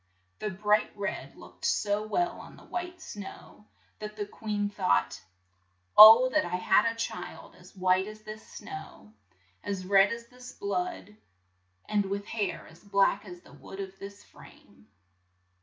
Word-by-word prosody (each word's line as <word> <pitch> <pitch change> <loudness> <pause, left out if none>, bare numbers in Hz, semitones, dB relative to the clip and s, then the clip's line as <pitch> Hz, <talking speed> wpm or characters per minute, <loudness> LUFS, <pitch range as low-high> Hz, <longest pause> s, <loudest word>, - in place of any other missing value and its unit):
The 215 - -2
bright 210 +2 +1
red 200 - -4
looked - - -16
so 210 +1 0
well 350 +9 -1
on - - -12
the - - -16
white 355 0 -6
snow, 205 -5 -10 0.3
that 210 0 -7
the 205 - -2
queen 205 0 -3
thought, 90 - 0 0.7
"Oh, 225 +4 +11
that 310 +4 +2
I 175 - -3
had 210 +5 +3
a - - -9
child 230 - -6
as - - -18
white 185 +1 +2
as 215 0 -10
this 215 0 -8
snow, 110 -9 -10 0.5
as 195 -2 -4
red 195 +1 +5
as 235 0 -5
this 250 0 -12
blood, 360 - -4 0.7
and 205 -1 +1
with 200 +1 -3
hair 195 -8 -3
as 165 +3 -17
black 200 0 +2
as 175 -2 -10
the - - -18
wood 195 - -11
of 195 0 -7
this 200 0 -10
frame." 105 - -18
205 Hz, 155 wpm, -29 LUFS, 190-220 Hz, 0.7 s, Oh